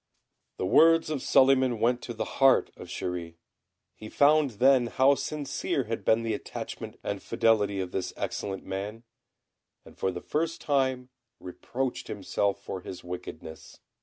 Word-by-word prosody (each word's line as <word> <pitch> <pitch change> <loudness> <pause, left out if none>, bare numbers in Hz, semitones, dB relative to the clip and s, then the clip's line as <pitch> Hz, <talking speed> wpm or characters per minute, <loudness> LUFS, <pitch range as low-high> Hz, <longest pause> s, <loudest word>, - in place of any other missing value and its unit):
The - - -2
words 165 - +5
of 145 -4 -2
Suliman 130 -3 +4
went 120 +2 +2
to 120 - -6
the 110 0 -2 0.2
heart 135 0 +5
of - - -10
Chéri. 85 -2 -5 0.6
He 110 - -10
found 150 +2 +4
then 130 0 +4
how 130 +4 +4
sincere 140 -1 -2
had 115 0 -4
been 110 +1 +3
the 115 -1 -1
attachment - - -7
and - - -3
fidelity 105 -3 +1
of 90 -1 -3
this 95 -1 -3
excellent 95 -1 -4
man, 105 +4 -5 0.8
and - - -15
for 95 - -1
the 90 - -6
first 165 - -2
time 130 -3 0 0.3
reproached 125 +8 -4
himself 100 0 -1
for 95 - -5
his 90 0 -9
wickedness. 90 -3 -9
115 Hz, 150 wpm, -28 LUFS, 95-135 Hz, 0.8 s, words